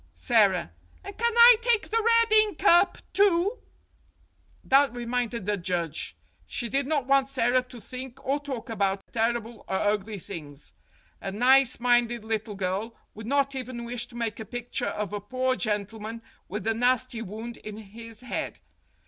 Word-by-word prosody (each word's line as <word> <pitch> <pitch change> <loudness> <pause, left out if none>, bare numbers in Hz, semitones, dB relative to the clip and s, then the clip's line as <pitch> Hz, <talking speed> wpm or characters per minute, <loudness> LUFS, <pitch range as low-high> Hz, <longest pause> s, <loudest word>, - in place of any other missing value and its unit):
Sara: 200 - +2 0.3
And 400 - -8
can 470 0 0
I 470 0 +9
take 470 -3 +2
the 455 +1 +2
red 460 -1 +4
ink 430 -2 +5
up, 350 -1 +5 0.2
too? 400 +2 +3 1.0
That 275 0 +4
reminded 240 -3 -3
the 205 0 0
judge. 170 -3 -3 0.3
She 240 -2 -4
did 275 +3 0
not 290 -4 0
want 275 0 +3
Sara 255 -1 +2
to 250 -1 -13
think 255 +3 -9
or 275 +2 0
talk 275 -5 -6
about 195 -3 0
terrible 230 0 -1
or - - -2
ugly 205 +1 -1
things. 150 -6 -9 0.5
A 195 - -4
nice 255 +4 +4
minded 240 -2 +2
little 220 -1 -3
girl 195 +4 -3 0.2
would 215 +1 -9
not 275 +1 +1
even 255 -2 -5
wish 240 0 -4
to 240 - -16
make 230 -2 -3
a - - -4
picture 245 +1 -4
of 210 -2 -4
a 205 - -3
poor 255 +4 -1
gentleman 220 +1 -3 0.2
with 210 +3 -5
a 225 - +2
nasty 245 0 +1
wound 225 +3 -7
in 215 -1 -9
his 225 +2 -11
head. 250 - -4
235 Hz, 165 wpm, -26 LUFS, 215-265 Hz, 1.0 s, I